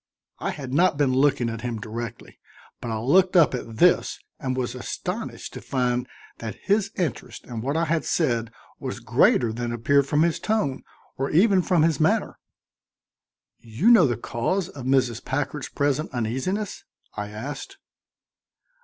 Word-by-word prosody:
I - - -2
had 130 -2 -6
not 170 0 +3
been 140 -3 +2
looking 130 -2 +3
at 115 -1 -4
him 120 -2 -3
directly, 115 +1 -7 0.4
but 120 - -4
I 110 - -1
looked 180 +12 +3
up 165 -7 +6
at 115 -3 -5
this 180 +8 +3 0.2
and 130 -3 -2
was 125 -2 -2
astonished - - -5
to - - -7
find 125 -1 -1 0.3
that 115 -2 -5
his 200 0 +2
interest 125 -8 -4
in 115 -3 -5
what 140 +6 -1
I 165 - +2
had 165 0 0
said 115 -8 0 0.3
was - - -5
greater 115 -2 +3
than 120 +1 -3
appeared 135 +4 +2
from 150 +2 +3
his 170 -1 +1
tone 180 -12 0 0.4
or 135 - 0
even 190 +3 +4
from 175 -3 +2
his 160 -3 +2
manner. 155 0 +1 1.2
"You 120 - +2
know 210 -10 +7
the 120 -3 -1
cause 165 - -2
of 130 -4 -9
Mrs. 130 -3 +2
Packard's 145 +1 -3
present 145 +1 0
uneasiness?" 130 - -2 0.3
I 105 0 -4
asked. 145 - -7
135 Hz, 160 wpm, -24 LUFS, 120-165 Hz, 1.2 s, know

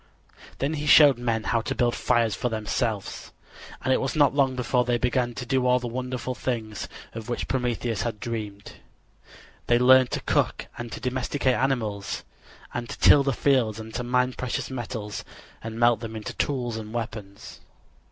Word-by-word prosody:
Then 140 +3 -1
he 150 -1 -3
showed 140 -4 +7
men 115 -2 -1
how 115 +1 +1
to - - -3
build 120 -2 +2
fires 115 -3 +1
for 125 - -1
themselves, 110 -1 -3 0.5
and 130 - +3
it - - +1
was 135 - -2
not 145 -4 +4
long 135 -2 +2
before 125 0 +1
they 120 0 +1
began 120 0 0
to 125 - -5
do 130 0 +1
all 125 0 +5
the 125 - -5
wonderful 125 +1 -3
things 115 -4 -3 0.3
of 115 0 -7
which 120 - -2
Prometheus 120 -4 -1
had 115 -3 -3
dreamed. 105 -4 -6 0.9
They 120 - +5
learned 130 +1 +6
to - - -3
cook - - 0
and 120 -1 -7
to - - -6
domesticate 130 +1 0
animals 110 -7 -1 0.5
and 120 -1 -4
to - - -6
till 145 - +7
the 135 0 +1
fields 120 -5 +2
and 110 0 -9
to 125 - -3
mine 125 +1 +1
precious 130 +1 -3
metals 110 -4 -5 0.4
and 110 0 -6
melt 120 -2 +4
them 115 -1 -6
into 110 -1 -5
tools 125 -5 -1
and 110 -1 -7
weapons. 110 -4 -6
120 Hz, 180 wpm, -26 LUFS, 110-130 Hz, 0.9 s, showed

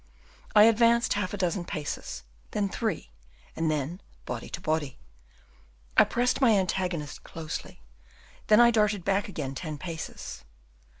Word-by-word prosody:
I 210 - +9
advanced 230 +1 +5
half 200 -3 -1
a 205 - -4
dozen 180 -1 0
paces, 150 - -5 0.3
then 205 -2 -1
three, 190 - -3 0.4
and 160 -1 0
then, 155 +5 -2 0.2
body 120 -2 -5
to - - -5
body, 155 -5 -1 1.0
I - - +7
pressed 250 +3 0
my 230 -5 +6
antagonist 180 -5 -2
closely, 155 - -7 0.6
then 215 +1 +6
I 240 0 +7
darted 210 -4 +2
back 200 +1 +1
again 140 -8 -4
ten 155 +1 -5
paces. 165 -1 -7
185 Hz, 135 wpm, -28 LUFS, 155-210 Hz, 1.0 s, I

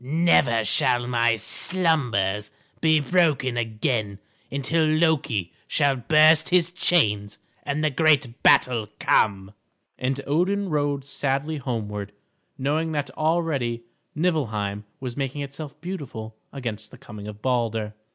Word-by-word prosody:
"Never 135 -6 +3
shall 120 +4 +2
my 120 -2 +2
slumbers 115 - 0 0.3
be 155 -1 +4
broken 150 -5 +1
again 110 -2 -2 0.3
until 140 +4 0
Loki 155 - +1
shall 140 -2 +2
burst 155 +5 +5
his 175 -1 +3
chains 105 - +1 0.2
and 145 +2 -2
the 155 - +2
great 140 -4 +2
battle 115 -4 +4
come." 100 -1 +1 0.5
And 130 +2 -1
Odin 190 +7 0
rode 145 -2 -1
sadly 140 +2 -2
homeward 105 -6 -4 0.4
knowing 155 +4 -1
that 145 -1 -2
already 155 -8 -1 0.3
Niflheim 110 - -1
was 125 -3 -6
making 140 +1 -3
itself 145 +1 -8
beautiful 135 -12 -7 0.2
against 110 -6 -6
the - - -14
coming 105 0 -10
of 105 0 -10
Balder. 115 -4 -1
135 Hz, 120 wpm, -24 LUFS, 110-155 Hz, 0.5 s, burst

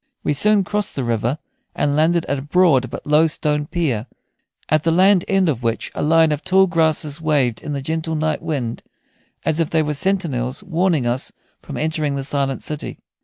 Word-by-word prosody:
We - - +1
soon 205 +7 +3
crossed 205 +1 -2
the 135 - -2
river, 120 +3 -1 0.4
and 145 -1 0
landed 165 +2 +2
at 140 - -2
a - - -5
broad 145 -4 +3
but - - -8
low 150 +2 +4
stone 150 -1 -1
pier, 135 -10 -1 0.6
at 155 0 +2
the 165 - 0
land 185 +2 +4
end 195 -2 +2
of 135 -7 -1
which 115 -1 -2
a - - -4
line 160 +1 +4
of 150 +1 -2
tall 190 +1 +4
grasses 160 -3 0
waved 140 -7 +1
in 150 - -5
the 140 -1 -4
gentle 160 +2 -2
night 155 0 -1
wind 125 -7 -3 0.6
as 160 0 0
if 165 - +1
they 160 -1 +2
were 150 0 -2
sentinels 150 -5 -1
warning 175 -6 +1
us 120 +2 -1 0.3
from - - -8
entering 155 -2 -1
the 135 - -3
silent 135 -1 -2
city. 150 -1 -5
155 Hz, 195 wpm, -20 LUFS, 140-165 Hz, 0.6 s, low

